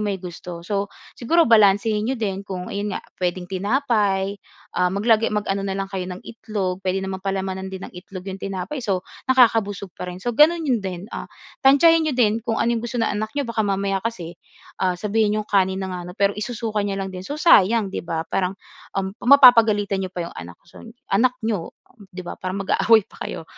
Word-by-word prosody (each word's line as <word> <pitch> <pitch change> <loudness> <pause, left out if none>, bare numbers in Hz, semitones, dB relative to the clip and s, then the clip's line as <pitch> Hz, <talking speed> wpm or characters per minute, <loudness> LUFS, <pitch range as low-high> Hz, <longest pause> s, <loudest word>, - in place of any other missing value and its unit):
may 205 -2 -1
gusto. 175 -1 -8
So 200 0 -1 0.3
siguro 330 +8 +3
balansehin 210 0 +4
n'yo 265 - -1
din 195 -3 -2
kung 185 -2 -6
ayon 205 +1 -2
nga, - - -8 0.2
puwedeng 180 0 -1
tinapay, 200 -1 0 0.3
ah, 180 - +2
maglagay 215 +4 +2
mag-ano 200 -2 -1
na 195 -1 -3
lang 195 0 -4
kayo 185 -1 -3
ng 180 0 -8
itlog. 200 -5 -4
Puwede 190 0 -1
naman 190 0 -4
palamanan 190 -1 -3
din 190 -1 -7
ng - - -10
itlog 180 0 -10
'yong 195 0 -6
tinapay, 195 +9 -4
so 195 -6 -2 0.2
nakakabusog 225 -7 +3
pa 180 - -7
rin, 180 - -6
so 240 - 0
gano'n 320 +6 +4
'yon 250 -6 +1
din. 185 -2 -5
Ah - - -6 0.3
tantsahin 305 +5 +6
n'yo 280 - -2
din 225 -2 +2
kung 225 -1 -2
ano 235 - +1
'yong 230 - -1
gusto 240 +2 -5
ng 225 -2 +1
anak 215 +1 -2
n'yo, 285 - 0
baka 230 -2 -2
mamaya 195 -1 0
kasi, 185 -6 -5 0.5
ah, 185 -1 +1
sabihin 210 +2 +1
n'yong 215 - -2
kanin 190 -2 +1
na 190 - -5
nga 180 - -4
ano, - - -7
pero 200 -1 +2
isusuka 215 0 -3
niya 200 -1 -2
lang 195 -1 -4
din. 185 - -6
So 280 +11 -6
sayang 220 - +4
'di - - -3
ba? 165 -1 -3
Parang 185 +2 -2 0.4
um, 190 0 -1
mapapagalitan 230 -7 +6
n'yo 190 - -3
pa 180 -1 -5
'yong 170 - -8
anak 85 0 -9
siyo, 175 - -15 0.3
anak 250 +5 +3
n'yo 210 -7 -3 0.2
um, 210 -6 -18
'di 185 0 -9
ba? 175 - -8
Parang 185 +1 -3
mag-aaway 220 +2 +4
pa - - -19
kayo - - -7
200 Hz, 210 wpm, -22 LUFS, 190-225 Hz, 0.5 s, tantsahin